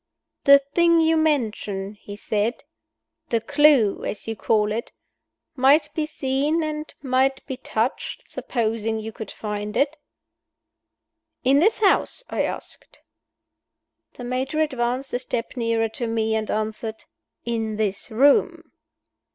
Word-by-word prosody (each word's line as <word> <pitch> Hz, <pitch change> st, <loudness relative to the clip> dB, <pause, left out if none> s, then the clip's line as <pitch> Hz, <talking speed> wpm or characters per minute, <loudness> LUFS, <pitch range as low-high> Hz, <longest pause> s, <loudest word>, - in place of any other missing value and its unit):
"The 280 Hz, 0 st, +9 dB
thing 335 Hz, +5 st, +2 dB
you 325 Hz, 0 st, +3 dB
mention," 215 Hz, -10 st, 0 dB
he 205 Hz, -1 st, -10 dB
said, 210 Hz, +3 st, -2 dB, 0.7 s
"the 230 Hz, -, +2 dB
clew 285 Hz, -5 st, +4 dB
(as 210 Hz, -, -5 dB
you 225 Hz, -, -2 dB
call 210 Hz, 0 st, +1 dB
it), 230 Hz, +2 st, -3 dB, 0.6 s
might 275 Hz, +4 st, +4 dB
be 310 Hz, -1 st, -1 dB
seen 290 Hz, +3 st, 0 dB
and 305 Hz, 0 st, -4 dB
might 265 Hz, 0 st, +1 dB
be 265 Hz, -, -4 dB
touched 235 Hz, -1 st, -2 dB
supposing 225 Hz, -2 st, -2 dB
you 220 Hz, +1 st, -6 dB
could 220 Hz, -1 st, -8 dB
find 210 Hz, -1 st, -4 dB
it." 290 Hz, +2 st, +1 dB, 1.5 s
"In 270 Hz, +2 st, +4 dB
this 425 Hz, +7 st, +2 dB
house?" 420 Hz, +4 st, +2 dB
I -, -, 0 dB
asked. -, -, -8 dB, 1.1 s
The 245 Hz, -, -9 dB
Major 260 Hz, +5 st, -2 dB
advanced 260 Hz, -2 st, -1 dB
a 245 Hz, -, 0 dB
step 245 Hz, -2 st, -4 dB
nearer 230 Hz, -2 st, 0 dB
to 230 Hz, +2 st, -4 dB
me, 225 Hz, -1 st, 0 dB
and 220 Hz, -1 st, -1 dB
answered 220 Hz, +1 st, -3 dB, 0.4 s
"In 225 Hz, -2 st, -2 dB
this 205 Hz, -2 st, -2 dB
room." 280 Hz, -, +3 dB
240 Hz, 130 wpm, -23 LUFS, 220-285 Hz, 1.5 s, The